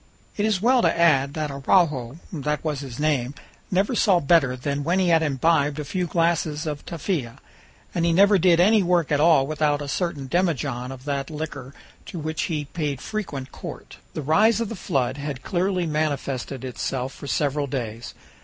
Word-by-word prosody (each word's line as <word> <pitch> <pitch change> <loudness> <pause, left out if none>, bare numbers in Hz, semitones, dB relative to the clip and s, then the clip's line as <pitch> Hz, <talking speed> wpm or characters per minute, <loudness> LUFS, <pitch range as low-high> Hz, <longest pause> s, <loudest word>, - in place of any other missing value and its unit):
It 210 +1 +1
is 215 - +2
as 185 - -4
well 250 +1 +4
to - - +2
add 140 -4 +3
that 155 -2 -2
Araujo 140 -2 +1 0.2
that 150 -1 -2
was 150 -3 -2
his 135 -4 -7
name 145 -3 0 0.3
never 195 +6 +1
saw 200 -6 +4
better 140 -4 +3
than 140 +3 -3
when 170 +5 +1
he 185 -2 +2
had 165 -1 +4
imbibed 150 0 +1
a 150 - -4
few 180 +5 -2
glasses 165 -2 0
of 150 -2 -4
tafia; 160 - -3 0.6
and 170 - 0
he 170 - +3
never 200 +3 +5
did 170 -1 +4
any 210 +4 +5
work 175 -4 +1
at 145 - +3
all 155 -3 +5
without 150 0 0
a 145 - -5
certain 150 -2 -2
demijohn 135 -7 -1
of 130 0 -10
that 140 0 -2
liquor, 150 -4 -6 0.3
to - - -7
which 155 0 -2
he 150 -3 -2
paid 145 -2 -3
frequent 145 -12 -5
court. - - -9 0.2
The 155 - -3
rise 215 +11 +4
of 230 -3 -2
the 225 - -5
flood 135 -7 -1
had 140 -2 -5
clearly 185 0 0
manifested 140 -4 -2
itself 130 +1 -3
for 140 - -10
several 145 0 0
days. 120 -4 -5
150 Hz, 190 wpm, -24 LUFS, 140-175 Hz, 0.6 s, never